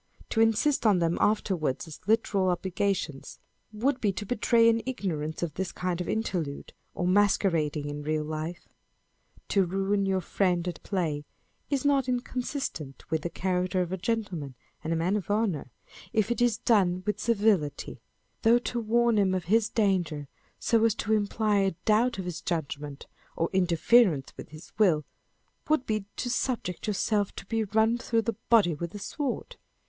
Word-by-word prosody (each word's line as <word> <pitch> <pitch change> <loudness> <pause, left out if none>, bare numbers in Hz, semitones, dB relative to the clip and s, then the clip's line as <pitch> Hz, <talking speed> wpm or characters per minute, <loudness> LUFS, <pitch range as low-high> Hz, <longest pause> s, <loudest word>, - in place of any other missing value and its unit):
To 225 - +2
insist 225 +6 +3
on 205 -3 +5
them 170 -1 +1
afterwards 180 -9 0
as 160 - -9
literal 205 -4 +2
obligations, 180 -4 -2 0.3
would 255 +5 0
be 205 - +2
to 205 +2 -5
betray 230 +1 +3
an 230 0 +3
ignorance 165 -11 -3
of 165 -4 -2
this 190 +2 -3
kind 180 -1 -2
of 180 - -4
interlude, 180 -10 -3 0.2
or 175 - -1
masquerading 180 -6 +2
in 145 0 -5
real 155 +1 -1
life. 155 +3 -5 0.8
To 195 - +3
ruin 195 +2 0
your 190 -1 +1
friend 180 0 0
at 175 - -5
play 160 -7 -2 0.5
is 280 -1 -1
not 275 -3 +3
inconsistent 245 - -4
with 160 -1 +1
the 170 - -3
character 185 +1 0
of 175 - -7
a 190 - -1
gentleman 180 - -3 0.3
and 160 - -3
a - - +2
man 170 +5 +1
of 205 -2 -3
honour, 205 - 0 0.4
if 220 0 +1
it 240 - -1
is 240 -3 +3
done 190 -6 +2
with 210 - -1
civility; 205 -10 +1 0.4
though 230 +1 +5
to 240 0 -3
warn 235 0 +2
him 190 -2 +2
of 185 - -2
his 220 +3 +3
danger, 175 -10 0 0.3
so 225 -1 +2
as 225 -2 +3
to 220 - -1
imply 210 0 +1
a 195 -3 +1
doubt 230 +2 +3
of 190 - -4
his 180 -3 -5
judgment, 145 -4 -4 0.3
or 165 - -1
interference 180 - +3
with - - -10
his 155 +2 -12
will, 170 -8 +4 0.6
would 305 -4 +2
be 215 -2 -1
to - - -3
subject 240 -8 -2
yourself 205 0 0
to - - -8
be 225 -1 -1
run 220 +3 +2
through 230 -2 0
the 230 -2 -2
body 215 -8 +5
with 170 +5 -6
a - - -5
sword. 270 +6 -4
195 Hz, 170 wpm, -28 LUFS, 170-225 Hz, 0.8 s, on